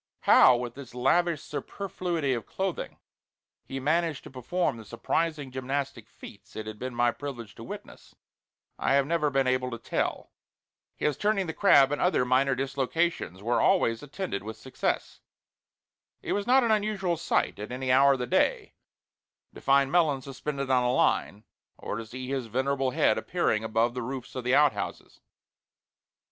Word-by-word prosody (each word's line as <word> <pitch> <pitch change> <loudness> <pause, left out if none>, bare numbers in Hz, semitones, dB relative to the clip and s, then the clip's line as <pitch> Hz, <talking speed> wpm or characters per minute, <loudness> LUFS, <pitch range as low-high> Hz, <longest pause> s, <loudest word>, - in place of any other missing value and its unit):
How, 125 - +7
with 120 -1 -5
this 130 -2 -11
lavish 160 +5 +2
superfluity 175 -7 -3
of 115 -4 -4
clothing, 190 -2 -4 0.7
he 135 - -6
managed 155 +2 0
to - - -11
perform 135 +2 -1
the 110 - -9
surprising 145 +6 -2
gymnastic 130 -3 -4
feats 105 - -14
it 110 - -5
had 110 -1 -8
been 130 -1 -5
my 120 0 +3
privilege 120 -5 -7
to - - -11
witness, - - -10 0.6
I - - +1
have 140 -1 +3
never 155 -1 +1
been 135 -1 +1
able 130 0 +1
to 120 - -5
tell. 115 - -3 0.6
His 150 -2 -1
"turning 205 0 +1
the 160 - -4
crab," 140 -9 +5
and 145 - -1
other 180 -8 +2
minor 130 +2 +2
dislocations, 135 - -1
were 120 +2 +1
always 115 -12 +2
attended 145 - -4
with 110 +2 -7
success. 130 - -3 1.0
It - - -1
was 205 +1 -2
not 260 +1 +5
an 230 - +2
unusual 205 -4 0
sight 165 - -1
at 105 +3 -6
any 130 +1 -2
hour 140 +2 +6
of - - -1
the - - -1
day 120 - +1 0.8
to - - -12
find 135 0 +3
Melons 155 -7 +2
suspended 140 0 -4
on 125 -1 +4
a 125 - +2
line, 105 -4 +1 0.3
or - - -5
to 115 -1 -6
see 130 +3 -7
his 130 -3 -3
venerable 135 +3 0
head 125 - +2
appearing 110 0 0
above 115 +2 +1
the 125 - -4
roofs 130 +1 -6
of 130 - -5
the 125 +1 +3
outhouses. 130 -10 0
135 Hz, 170 wpm, -28 LUFS, 125-155 Hz, 1.0 s, How